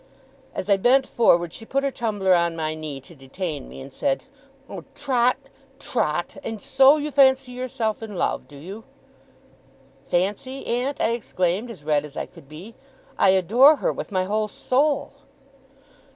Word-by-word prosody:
As - - -4
I 200 -1 +4
bent 260 +6 +4
forward, 175 -10 +2
she - - -9
put 275 +4 -1
her 275 - 0
tumbler 205 -6 0
on 170 -1 +2
my 155 -1 -2
knee 155 -3 -6
to 170 - -16
detain 145 +1 -6
me, - - -10
and 135 0 -11
said: 275 - -1 0.4
'Oh, - - -8
Trot, 255 -3 +1 0.4
Trot! 175 - -2
And 225 -1 -5
so 270 +6 +5
you 300 0 -3
fancy 265 -1 +4
yourself 245 -4 -3
in 215 -3 -7
love! - - -1
Do 145 - -13
you?' 195 +9 -9 1.2
'Fancy, 205 +9 -2
aunt!' 250 +4 -1
I - - +2
exclaimed, 205 -1 -1
as 195 -11 -10
red 150 -1 +1
as 150 -1 -11
I - - -2
could 135 - -17
be. 175 +9 -10 0.5
'I 195 - +5
adore 220 - +6
her - - -1
with - - -7
my 185 -1 +1
whole 215 +3 -1
soul! 280 +7 0
215 Hz, 165 wpm, -23 LUFS, 170-255 Hz, 1.2 s, adore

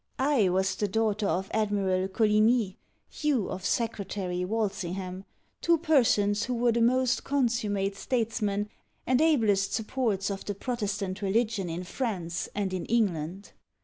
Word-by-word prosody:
I 265 -8 +3
was 190 +1 +1
the 205 - -1
daughter 215 0 0
of 190 +2 -1
Admiral 200 -3 +1
Coligni, 215 +1 +3 0.5
you 285 -9 +1
of 185 - -5
Secretary 200 -6 -2
Walsingham, 190 -2 -3 0.4
two 335 0 +4
persons 230 -10 +3
who 250 - -2
were 240 0 +2
the 235 +1 +1
most 255 +1 +2
consummate 220 -7 0
statesmen 210 -3 -1 0.4
and 255 +2 +3
ablest 210 -11 +3
supports 215 -4 -1
of 195 - -5
the 205 - -4
Protestant 205 -4 -3
religion 210 -1 0
in 170 +2 -4
France, 175 -6 -3
and 200 -2 -1
in 185 - -3
England. 195 -4 -1
205 Hz, 135 wpm, -28 LUFS, 190-235 Hz, 0.5 s, two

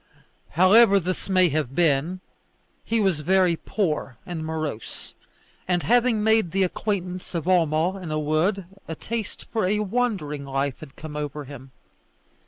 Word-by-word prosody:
However 200 +3 +6
this 185 +1 -4
may 185 -2 +4
have 145 -3 -2
been, 165 +2 +1 0.6
he 230 - 0
was 190 -7 +1
very 180 +2 +3
poor 155 - -2
and 170 -3 -5
morose, 155 -7 -5 0.5
and 180 -1 +1
having 240 -2 +3
made 220 -4 +3
the 195 +3 +1
acquaintance 185 -1 -3
of 165 - -2
Homo 175 0 +2
in 180 -4 -7
a 155 - -1
wood, 160 +6 0 0.2
a 160 - -4
taste 225 +4 -5
for 225 - +1
a 205 +3 +1
wandering 200 -9 -1
life 135 0 -2
had 155 -4 -12
come 155 -1 -8
over 150 0 -4
him. 135 -1 -11
175 Hz, 150 wpm, -24 LUFS, 150-195 Hz, 0.6 s, However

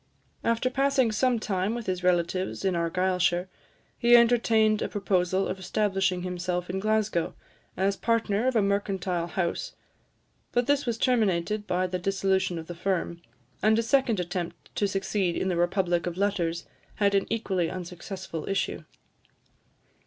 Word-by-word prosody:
After 230 +2 +1
passing 270 -3 +2
some 245 +3 +2
time 205 0 -1
with 240 -2 -5
his 185 -1 -2
relatives 180 +2 0
in 190 -2 +2
Argyllshire, 180 +1 +1 0.5
he 240 0 +6
entertained 225 -2 +3
a - - -1
proposal 190 -2 0
of 190 - -4
establishing 190 -1 0
himself 180 0 -3
in 190 - -2
Glasgow, 215 -4 0 0.4
as 195 +1 +1
partner 230 0 +1
of 260 - +1
a 220 - +4
mercantile 195 -3 -1
house, 175 -1 -2 0.8
but 245 0 +2
this 285 0 +1
was 235 -2 0
terminated 210 -4 +1
by 180 0 +1
the 180 0 -3
dissolution 190 -1 0
of 160 - -6
the 175 - -7
firm; 170 -1 -2 0.4
and 215 +1 +4
a 230 - +2
second 240 -3 +2
attempt 175 -1 -5
to 205 - +1
succeed 195 -2 -1
in 190 - 0
the 180 - 0
republic 175 0 +1
of 175 0 -4
letters 175 -4 0 0.3
had 200 -1 +2
an 195 -1 +2
equally 190 -7 0
unsuccessful 180 -2 -6
issue. 195 - -1
190 Hz, 150 wpm, -27 LUFS, 180-215 Hz, 0.8 s, he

